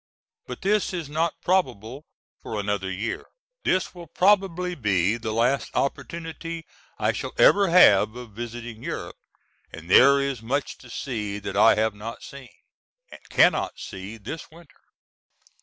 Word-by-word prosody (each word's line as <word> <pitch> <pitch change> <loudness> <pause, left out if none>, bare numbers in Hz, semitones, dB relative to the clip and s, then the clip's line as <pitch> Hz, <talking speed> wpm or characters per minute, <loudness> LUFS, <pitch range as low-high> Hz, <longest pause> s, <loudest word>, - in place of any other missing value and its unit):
But - - -8
this 205 0 +1
is 165 -5 -5
not 160 +2 -1
probable 130 - -1 0.4
for 110 - -5
another 100 -1 -2
year. 105 +5 -4 0.4
This 185 - 0
will 175 -2 -11
probably 180 0 +2
be 100 - +1
the 110 -1 -4
last 120 +5 +1
opportunity 165 +4 -4 0.3
I - - +1
shall - - -5
ever 200 -1 +6
have 110 - +6
of 120 -2 -9
visiting 120 +1 -7
Europe, - - -6 0.5
and 85 +2 -10
there 140 +5 +7
is 140 -4 -2
much 135 +5 -3
to 125 - -15
see 105 -5 -4
that 100 - -6
I 105 +3 +6
have 110 0 +1
not 110 +3 -8
seen, 140 -2 -11 0.6
and - - -12
cannot - - +3
see 95 +4 -8
this 115 +10 -8
winter. 165 0 -18
125 Hz, 145 wpm, -25 LUFS, 110-165 Hz, 0.6 s, there